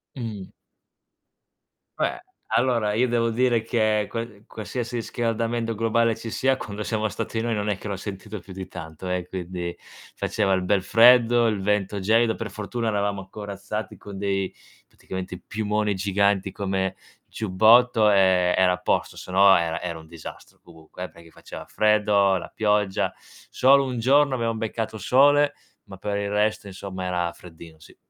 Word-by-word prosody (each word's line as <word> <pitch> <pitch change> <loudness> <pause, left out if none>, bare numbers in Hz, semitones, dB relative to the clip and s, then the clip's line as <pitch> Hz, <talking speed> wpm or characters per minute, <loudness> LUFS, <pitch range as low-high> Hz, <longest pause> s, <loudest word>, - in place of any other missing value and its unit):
Mhmm. 110 -7 -5 1.5
Beh, - - -1 0.3
allora 120 -4 +1
io 120 +4 +2
devo 115 -1 +1
dire 120 0 +2
che 110 -2 +1
qua 115 0 -3 0.2
qualsiasi 115 +2 -5
riscaldamento 115 0 -2
globale 115 +1 +2
ci 115 - -7
sia, 130 +3 +1
quando 105 -4 -6
siamo 110 0 -1
stati 110 +1 -4
noi 115 0 -1
non 105 0 -2
è 100 - 0
che 105 - -8
l'ho 100 - -3
sentito 95 +2 -7
più 100 - -14
di 95 0 -7
tanto 80 +2 -8
eh, 90 -1 -2
quindi 90 -1 -5 0.4
faceva 100 -3 -1
il 95 -1 +2
bel 95 0 +1
freddo, 120 +1 +6
il 105 -3 -1
vento 100 0 0
gelido; 110 +3 +3
per 110 -3 -6
fortuna 110 +3 -3
eravamo 100 -2 -2
corazzati 105 +1 -6
con 100 -1 -10
dei 95 -1 -1 0.3
praticamente 95 -1 -7
piumoni 105 0 -1
giganti 100 0 +1
come 95 -1 -2 0.3
giubbotto, 110 +2 +4
e 95 -2 +4
era 95 -1 +4
a 90 - -2
posto, 90 - -1
se - - -9
no 95 +1 +6
era 85 -1 0
era 85 -2 -4
un 80 - -13
disastro, 80 -1 -11
comunque 80 +1 -12
eh, 90 - -5
perché 85 0 -17
faceva - - -10
freddo, 105 -2 +3
la 90 - -5
pioggia. 105 -2 +1 0.4
Solo 140 +2 +4
un 125 -2 -3
giorno 135 +3 +4
abbiamo 115 -2 -1
beccato 110 0 -3
sole, 145 +6 +4 0.3
ma 95 - -11
per 100 +2 -3
il 100 0 -2
resto 105 0 0
insomma 95 -1 -6
era 90 -1 -1
freddino, 80 -2 -14
sì. 80 - -17
105 Hz, 160 wpm, -24 LUFS, 95-115 Hz, 1.5 s, freddo